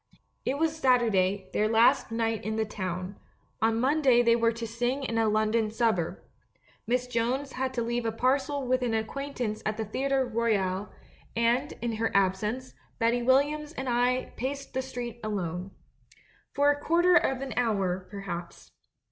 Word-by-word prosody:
It 265 Hz, +2 st, 0 dB
was 320 Hz, +1 st, +1 dB
Saturday, 205 Hz, -8 st, +2 dB
their 215 Hz, -, +2 dB
last 225 Hz, +2 st, +4 dB
night 225 Hz, -1 st, -1 dB
in 220 Hz, +2 st, -2 dB
the 220 Hz, 0 st, 0 dB
town; 185 Hz, -2 st, -5 dB, 0.4 s
on 225 Hz, 0 st, +2 dB
Monday 260 Hz, -2 st, +4 dB
they 235 Hz, 0 st, +5 dB
were 230 Hz, -1 st, +3 dB
to 230 Hz, 0 st, -5 dB
sing 240 Hz, +4 st, -2 dB
in 230 Hz, -3 st, -1 dB
a 220 Hz, -1 st, +3 dB
London 215 Hz, +1 st, +1 dB
suburb. 220 Hz, -7 st, 0 dB, 0.7 s
Miss 250 Hz, +1 st, +1 dB
Jones 250 Hz, +3 st, -1 dB
had 260 Hz, 0 st, -2 dB
to 235 Hz, -, 0 dB
leave 240 Hz, +1 st, -1 dB
a 225 Hz, -, 0 dB
par 255 Hz, +5 st, +2 dB
cel 275 Hz, 0 st, -4 dB
with 255 Hz, +1 st, +1 dB
an 235 Hz, -2 st, 0 dB
acquaintance 235 Hz, -1 st, -3 dB
at 215 Hz, 0 st, -2 dB
the 220 Hz, -, -2 dB
Theatre 265 Hz, +5 st, 0 dB
Royal, 210 Hz, -5 st, 0 dB, 0.5 s
and, 240 Hz, +5 st, +1 dB
in 230 Hz, -2 st, -1 dB
her 225 Hz, 0 st, +1 dB
absence, 210 Hz, +6 st, 0 dB, 0.2 s
Betty 235 Hz, 0 st, +2 dB
WiUiams 290 Hz, +5 st, +2 dB
and 265 Hz, -, -3 dB
I 245 Hz, +1 st, +1 dB
paced 275 Hz, +3 st, -4 dB
the 260 Hz, -, 0 dB
street 245 Hz, -3 st, -6 dB
alone. 185 Hz, -3 st, -3 dB, 0.9 s
A 285 Hz, +1 st, +5 dB
quarter 345 Hz, +4 st, +3 dB
of 265 Hz, -6 st, +2 dB
an 275 Hz, -1 st, -4 dB
hour, 195 Hz, -6 st, 0 dB
perhaps. 180 Hz, -4 st, -7 dB
235 Hz, 165 wpm, -28 LUFS, 215-260 Hz, 0.9 s, they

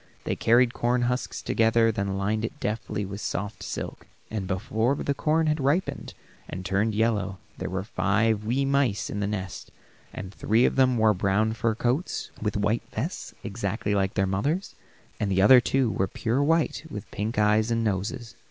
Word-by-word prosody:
They -, -, -1 dB
carried 120 Hz, +1 st, +4 dB
corn 120 Hz, +1 st, +1 dB
husks 125 Hz, +1 st, -2 dB
together, 115 Hz, 0 st, +3 dB
then 100 Hz, -3 st, -2 dB
lined 105 Hz, +3 st, 0 dB
it 145 Hz, +6 st, -4 dB
deftly 105 Hz, -1 st, -2 dB
with 100 Hz, +1 st, -6 dB
the -, -, -4 dB
soft 105 Hz, +1 st, -3 dB
silk, -, -, -6 dB, 0.2 s
and 105 Hz, -4 st, -3 dB
before 110 Hz, +6 st, 0 dB
the 140 Hz, -, -1 dB
corn 160 Hz, +3 st, +1 dB
had 155 Hz, 0 st, +1 dB
ripened 145 Hz, +7 st, -1 dB, 0.3 s
and 95 Hz, 0 st, -6 dB
turned 100 Hz, +3 st, +1 dB
yellow, 105 Hz, -4 st, 0 dB, 0.2 s
there -, -, -3 dB
were 95 Hz, 0 st, -2 dB
five 105 Hz, +3 st, +1 dB
wee 125 Hz, +6 st, 0 dB
mice 135 Hz, -7 st, +1 dB
in 105 Hz, -, -3 dB
the 100 Hz, -, 0 dB
nest, 95 Hz, -3 st, -5 dB, 0.4 s
and 95 Hz, 0 st, -7 dB
three 110 Hz, +5 st, +2 dB
of -, -, +1 dB
them 130 Hz, -2 st, +4 dB
wore 110 Hz, -1 st, +4 dB
brown 100 Hz, +3 st, +1 dB
fur 115 Hz, -1 st, 0 dB
coats, 125 Hz, -, -1 dB
with 105 Hz, -1 st, -1 dB
white 105 Hz, +3 st, +1 dB
vests, 145 Hz, -, -4 dB
exactly 105 Hz, 0 st, -2 dB
like 95 Hz, -1 st, 0 dB
their 95 Hz, -, +2 dB
mother's, 140 Hz, -, -1 dB, 0.5 s
and 105 Hz, -, 0 dB
the 95 Hz, 0 st, +3 dB
other 125 Hz, +4 st, +8 dB
two 130 Hz, -1 st, +1 dB
were 95 Hz, -, 0 dB
pure 115 Hz, +7 st, -1 dB
white 165 Hz, +2 st, +1 dB
with 105 Hz, -5 st, -8 dB
pink 105 Hz, +2 st, -3 dB
eyes 105 Hz, +1 st, +3 dB
and 115 Hz, 0 st, +1 dB
noses. 115 Hz, +3 st, -2 dB
110 Hz, 185 wpm, -26 LUFS, 100-120 Hz, 0.5 s, other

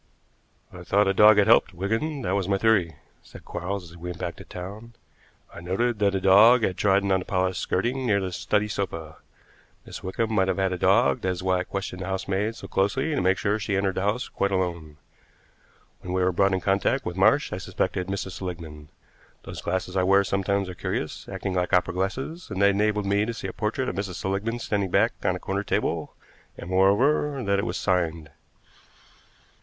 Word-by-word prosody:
"I 90 Hz, 0 st, -9 dB
thought 100 Hz, +3 st, +2 dB
a 95 Hz, -, +2 dB
dog 105 Hz, +2 st, +7 dB
had 105 Hz, -, +5 dB
helped, 95 Hz, -, +4 dB
Wigan; 115 Hz, -, -2 dB
that 90 Hz, -, -1 dB
was 100 Hz, -2 st, 0 dB
my 100 Hz, -1 st, +1 dB
theory," 95 Hz, -8 st, +2 dB, 0.3 s
said -, -, -14 dB
Quarles 90 Hz, -1 st, -5 dB
as -, -, -14 dB
we 90 Hz, +1 st, -7 dB
went 90 Hz, -, -6 dB
back 85 Hz, -1 st, -4 dB
to -, -, -10 dB
town. 100 Hz, +6 st, -9 dB, 0.6 s
"I 85 Hz, -, -9 dB
noted 105 Hz, +6 st, -1 dB
that 100 Hz, -1 st, +2 dB
a -, -, +1 dB
dog 110 Hz, +6 st, +6 dB
had 95 Hz, -, 0 dB
trodden 100 Hz, +1 st, +2 dB
on 95 Hz, -, +3 dB
the 90 Hz, -, -7 dB
polished 95 Hz, -1 st, -1 dB
skirting 125 Hz, +7 st, -1 dB
near 100 Hz, -3 st, +3 dB
the 95 Hz, -2 st, -3 dB
study 105 Hz, +4 st, 0 dB
sofa. 85 Hz, -7 st, -5 dB, 0.7 s
Miss -, -, -9 dB
Wickham 110 Hz, +4 st, -2 dB
might 95 Hz, -3 st, +2 dB
have 95 Hz, -, 0 dB
had 95 Hz, -1 st, 0 dB
a -, -, -2 dB
dog, 70 Hz, -4 st, +3 dB
that 95 Hz, -, -1 dB
is 90 Hz, 0 st, -3 dB
why 95 Hz, -1 st, +1 dB
I -, -, -1 dB
questioned 95 Hz, -1 st, -5 dB
the 90 Hz, -, -4 dB
housemaid 95 Hz, +3 st, -2 dB
so -, -, -9 dB
closely 130 Hz, +11 st, 0 dB
to 145 Hz, -, 0 dB
make 95 Hz, +1 st, +2 dB
sure 105 Hz, +1 st, 0 dB
she 100 Hz, -1 st, -2 dB
entered 95 Hz, -1 st, +1 dB
the 95 Hz, -, -2 dB
house 105 Hz, +6 st, -1 dB
quite 100 Hz, -, -1 dB
alone. 85 Hz, -5 st, -3 dB, 1.0 s
When 90 Hz, -, -6 dB
we 95 Hz, 0 st, +1 dB
were 90 Hz, -, +2 dB
brought 95 Hz, +2 st, +2 dB
in 95 Hz, -, -3 dB
contact 100 Hz, +8 st, +1 dB
with 90 Hz, -, -4 dB
Marsh 110 Hz, +10 st, +3 dB
I 90 Hz, -, -3 dB
suspected 90 Hz, -1 st, -2 dB
Mrs. 95 Hz, -1 st, -4 dB
Seligmann. 80 Hz, -5 st, -7 dB, 0.6 s
Those -, -, -8 dB
glasses 95 Hz, +1 st, -3 dB
I 95 Hz, -, +3 dB
wear 95 Hz, +2 st, +4 dB
sometimes 100 Hz, 0 st, -1 dB
are 90 Hz, -, -6 dB
curious, -, -, -4 dB
acting 95 Hz, -, -4 dB
like 90 Hz, -1 st, -1 dB
opera 90 Hz, 0 st, +3 dB
glasses, 130 Hz, -, -4 dB
and 95 Hz, -3 st, -4 dB
they 100 Hz, 0 st, +5 dB
enabled 105 Hz, +1 st, 0 dB
me 100 Hz, +1 st, +2 dB
to 115 Hz, +2 st, -3 dB
see -, -, -7 dB
a -, -, -4 dB
portrait 115 Hz, +4 st, -2 dB
of -, -, -3 dB
Mrs. 95 Hz, -2 st, -4 dB
Seligmann 100 Hz, +6 st, -2 dB
standing 100 Hz, -4 st, -2 dB
back 105 Hz, +6 st, +3 dB
on 90 Hz, -, +1 dB
a -, -, -6 dB
corner 100 Hz, +2 st, -2 dB
table, -, -, -2 dB, 0.4 s
and, 85 Hz, -, -8 dB
moreover, 130 Hz, +9 st, +2 dB
that 100 Hz, -1 st, +1 dB
it -, -, -2 dB
was -, -, -3 dB
signed. 85 Hz, -5 st, -1 dB
95 Hz, 215 wpm, -25 LUFS, 90-105 Hz, 1.0 s, dog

